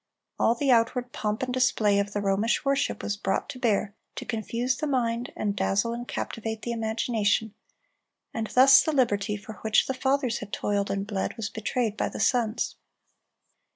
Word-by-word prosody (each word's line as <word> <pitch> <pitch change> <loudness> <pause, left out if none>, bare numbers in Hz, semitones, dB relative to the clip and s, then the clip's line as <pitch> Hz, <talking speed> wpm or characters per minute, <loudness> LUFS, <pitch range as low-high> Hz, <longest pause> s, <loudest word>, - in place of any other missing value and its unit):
All 230 - +3
the 275 +2 +1
outward 245 +1 +2
pomp 215 +2 -2
and 250 -1 -2
display 215 -5 +3
of 200 0 -1
the 205 - -2
Romish 205 +7 +1
worship 275 0 0
was 205 - -1
brought 195 -1 -1
to 255 - -7
bear 215 -4 +1 0.2
to - - -6
confuse 235 +3 -1
the 305 - -3
mind, 240 -3 -1
and 205 -1 -1
dazzle 205 +4 +1
and 240 +1 -6
captivate 225 -1 -4
the 240 - -2
imagination; 220 -2 0 0.8
and 225 -1 -2
thus 265 +2 +7
the 315 - -1
liberty 210 -6 +1
for 210 +2 -11
which 220 -1 +3
the 265 - -2
fathers 265 -2 0
had 210 -1 -8
toiled 200 -1 -1
and 195 0 -2
bled 205 -2 -3
was 215 -3 -3
betrayed 220 0 -2
by - - 0
the - - -7
sons. 235 -3 +1
225 Hz, 180 wpm, -27 LUFS, 205-250 Hz, 0.8 s, thus